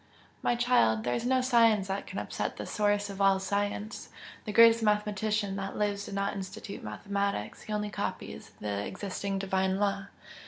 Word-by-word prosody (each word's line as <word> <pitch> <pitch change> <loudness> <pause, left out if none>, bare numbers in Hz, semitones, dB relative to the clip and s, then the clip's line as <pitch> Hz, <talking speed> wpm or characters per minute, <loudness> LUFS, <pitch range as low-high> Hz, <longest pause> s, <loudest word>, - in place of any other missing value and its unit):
"My 240 - +2
child, 235 - +3
there 120 - 0
is 230 - -1
no 260 0 +3
science 230 -6 +4
that 195 +1 -3
can - - -7
upset - - -3
the - - -5
Source 205 -1 +1
of 200 0 -6
all 195 -1 +5
science! 205 +2 -2 0.4
The 215 - -3
greatest 230 +1 +7
mathematician 210 -1 +1
that 195 0 -4
lives 205 -1 0
did 195 - -6
not 200 0 0
institute 195 0 -7
mathematics 200 - -3
he - - -9
only 210 0 -2
copies - - -5
the 100 -1 -2
existing 195 - -3
Divine 190 0 0
law." 200 -1 0
200 Hz, 170 wpm, -30 LUFS, 195-210 Hz, 0.4 s, greatest